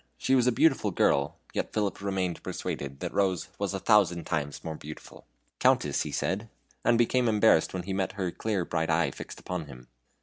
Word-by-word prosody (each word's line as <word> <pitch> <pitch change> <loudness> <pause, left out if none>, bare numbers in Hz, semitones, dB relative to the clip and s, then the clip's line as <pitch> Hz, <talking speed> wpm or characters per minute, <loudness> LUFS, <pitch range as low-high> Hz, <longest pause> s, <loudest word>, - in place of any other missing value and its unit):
She 130 - 0
was 125 -2 +4
a - - +5
beautiful 130 -4 +3
girl; 70 -5 +2 0.2
yet - - -2
Philip 105 -3 -1
remained 95 -3 -2
persuaded 70 -1 -5
that - - -4
Rose 95 -3 +1
was 100 -1 -1
a - - -2
thousand 95 -5 +3
times 75 -2 -3
more 80 - -4
beautiful. 75 +1 -11 0.3
"Countess," - - +3
he - - -3
said, 105 +4 -2 0.3
and 120 - +4
became 120 +1 +3
embarrassed 105 -6 +4
when 90 -1 -4
he 95 +2 -4
met 95 0 -1
her 95 -3 -2
clear 100 -4 -2
bright 80 -1 -1
eye 80 +1 +2
fixed - - -9
upon 90 -4 -5
him. 60 -3 -12
95 Hz, 195 wpm, -28 LUFS, 80-105 Hz, 0.3 s, a